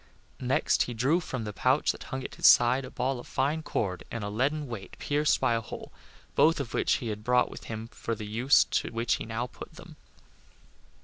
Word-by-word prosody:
Next 130 Hz, +1 st, +1 dB
he 120 Hz, -, -5 dB
drew 135 Hz, +9 st, +2 dB
from 130 Hz, -8 st, -5 dB
the 105 Hz, -1 st, -5 dB
pouch 130 Hz, +7 st, +2 dB
that -, -, -10 dB
hung 130 Hz, -2 st, -5 dB
at -, -, -7 dB
his -, -, +3 dB
side 125 Hz, +2 st, +6 dB
a -, -, -8 dB
ball 130 Hz, 0 st, -2 dB
of -, -, -10 dB
fine 145 Hz, +4 st, 0 dB
cord 95 Hz, -, -2 dB
and 115 Hz, -2 st, -5 dB
a 100 Hz, -, -3 dB
leaden 140 Hz, +7 st, 0 dB
weight 105 Hz, -6 st, -8 dB
pierced 150 Hz, +1 st, +1 dB
by 120 Hz, -, +2 dB
a 115 Hz, -, 0 dB
hole, 110 Hz, -, -9 dB, 0.4 s
both 165 Hz, 0 st, +4 dB
of 135 Hz, -5 st, -4 dB
which -, -, +2 dB
he 120 Hz, -, -2 dB
had 105 Hz, 0 st, -5 dB
brought 125 Hz, +1 st, +2 dB
with -, -, -10 dB
him 110 Hz, 0 st, -6 dB
for 115 Hz, -, -4 dB
the 105 Hz, -, -7 dB
use 125 Hz, +8 st, +4 dB
to -, -, -1 dB
which 115 Hz, 0 st, 0 dB
he -, -, -7 dB
now 115 Hz, +2 st, -2 dB
put 125 Hz, -, -11 dB
them. 165 Hz, -2 st, -13 dB
125 Hz, 225 wpm, -28 LUFS, 115-140 Hz, 0.4 s, side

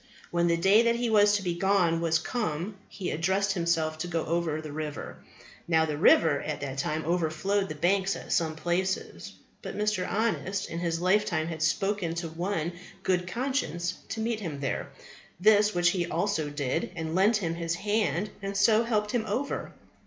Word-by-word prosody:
When 170 Hz, 0 st, +2 dB
the 170 Hz, 0 st, +2 dB
day 195 Hz, +6 st, +5 dB
that 235 Hz, 0 st, +2 dB
he 235 Hz, -1 st, -1 dB
was 205 Hz, -1 st, +5 dB
to 205 Hz, -, -1 dB
be 175 Hz, -2 st, -1 dB
gone 175 Hz, -2 st, +2 dB
was 165 Hz, -1 st, +2 dB
come 175 Hz, -1 st, -3 dB, 0.2 s
he 190 Hz, -3 st, -4 dB
addressed 190 Hz, +5 st, +1 dB
himself 165 Hz, -3 st, 0 dB
to 175 Hz, -, -3 dB
go 165 Hz, -2 st, -2 dB
over 165 Hz, -2 st, -1 dB
the 155 Hz, -1 st, -7 dB
river. 150 Hz, -1 st, -5 dB, 0.5 s
Now, 160 Hz, -1 st, +3 dB
the 150 Hz, -2 st, -2 dB
river 150 Hz, -1 st, +4 dB
at 150 Hz, -1 st, -4 dB
that 135 Hz, -1 st, -4 dB
time 155 Hz, +3 st, -2 dB
overflowed 175 Hz, +4 st, 0 dB
the 155 Hz, -, -5 dB
banks 190 Hz, +4 st, +1 dB
at -, -, -8 dB
some 160 Hz, -3 st, +1 dB
places. 175 Hz, +4 st, -2 dB, 0.3 s
But -, -, -6 dB
Mr. 210 Hz, -3 st, 0 dB
Honest 200 Hz, -2 st, -1 dB
in 165 Hz, -, -3 dB
his 170 Hz, -1 st, -1 dB
lifetime 185 Hz, -4 st, +2 dB
had 160 Hz, -2 st, -5 dB
spoken 185 Hz, +1 st, 0 dB
to 170 Hz, -1 st, -3 dB
one 170 Hz, 0 st, -2 dB, 0.3 s
Good 180 Hz, -1 st, +1 dB
conscience 185 Hz, -, -1 dB, 0.2 s
to 225 Hz, -, -3 dB
meet 225 Hz, 0 st, -1 dB
him 160 Hz, -8 st, -5 dB
there, 135 Hz, -2 st, -3 dB, 0.5 s
the 210 Hz, +2 st, +6 dB
which 175 Hz, -1 st, +3 dB
he 180 Hz, -3 st, -1 dB
also 200 Hz, -8 st, -1 dB
did, 145 Hz, +1 st, -2 dB
and 160 Hz, -2 st, -4 dB
lent 200 Hz, +5 st, +4 dB
him 170 Hz, -5 st, -2 dB
his 165 Hz, 0 st, -2 dB
hand, 205 Hz, 0 st, 0 dB
and 195 Hz, 0 st, -3 dB
so 220 Hz, +3 st, +5 dB
helped 210 Hz, -3 st, 0 dB
him 240 Hz, -3 st, 0 dB
over. 275 Hz, +5 st, -2 dB
175 Hz, 185 wpm, -28 LUFS, 160-205 Hz, 0.5 s, the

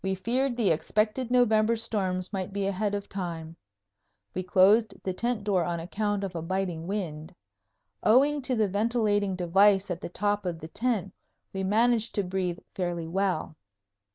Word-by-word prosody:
We 190 Hz, 0 st, 0 dB
feared 245 Hz, +6 st, 0 dB
the 220 Hz, -7 st, +3 dB
expected 215 Hz, +9 st, 0 dB
November 230 Hz, -2 st, +3 dB
storms 190 Hz, -4 st, -2 dB
might 190 Hz, -1 st, -3 dB
be 200 Hz, 0 st, -2 dB
ahead 200 Hz, +1 st, -1 dB
of 200 Hz, 0 st, -5 dB
time. 165 Hz, -4 st, -5 dB, 0.8 s
We 185 Hz, -, -2 dB
closed 195 Hz, +4 st, +4 dB
the 185 Hz, -, -2 dB
tent 235 Hz, +2 st, -2 dB
door 195 Hz, -4 st, +1 dB
on 170 Hz, 0 st, -2 dB
account 205 Hz, +4 st, -2 dB
of 190 Hz, -2 st, -4 dB
a 165 Hz, -, -3 dB
biting 175 Hz, -1 st, -3 dB
wind. 175 Hz, -4 st, -4 dB, 0.7 s
Owing 280 Hz, +6 st, +4 dB
to 255 Hz, -1 st, -1 dB
the 220 Hz, -2 st, +2 dB
ventilating 205 Hz, -1 st, +1 dB
device 195 Hz, +2 st, +3 dB
at 175 Hz, -, -4 dB
the -, -, -5 dB
top 205 Hz, +3 st, -1 dB
of 175 Hz, -3 st, -3 dB
the 160 Hz, -, -8 dB
tent, 215 Hz, -4 st, -1 dB, 0.4 s
we 190 Hz, 0 st, -2 dB
managed 225 Hz, +3 st, +2 dB
to 205 Hz, -, +1 dB
breathe 180 Hz, -1 st, -2 dB, 0.2 s
fairly 175 Hz, -3 st, -2 dB
well. 185 Hz, -3 st, -1 dB
195 Hz, 165 wpm, -27 LUFS, 180-215 Hz, 0.8 s, closed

